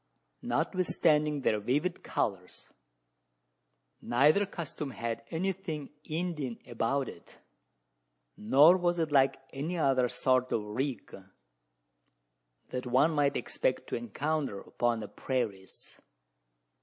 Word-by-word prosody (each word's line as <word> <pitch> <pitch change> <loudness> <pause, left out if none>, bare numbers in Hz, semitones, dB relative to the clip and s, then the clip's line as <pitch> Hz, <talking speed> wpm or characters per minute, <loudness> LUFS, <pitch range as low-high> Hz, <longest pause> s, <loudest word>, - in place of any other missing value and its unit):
Notwithstanding 150 -5 +1
their 110 -4 +2
vivid 145 - -1
colours, 95 -4 -4 1.3
neither 150 +11 +3
costume 160 -5 -5
had 115 -2 -4
anything 175 -3 -3
Indian 155 -7 -3
about 130 +2 -1
it: - - -12 1.0
nor 145 - +6
was 175 -1 +1
it 160 -2 -1
like 135 -1 +4 0.2
any 155 +6 -3
other 130 -5 +2
sort 130 0 +1
of 110 - 0
"rig" 120 +3 -4 1.5
that 125 0 -4
one 130 +6 +4
might 145 -2 +2
expect - - -1
to - - -1
encounter 155 - -2
upon 120 -2 -1
the 105 - -5
prairies. 110 -8 -4
140 Hz, 105 wpm, -30 LUFS, 120-160 Hz, 1.5 s, nor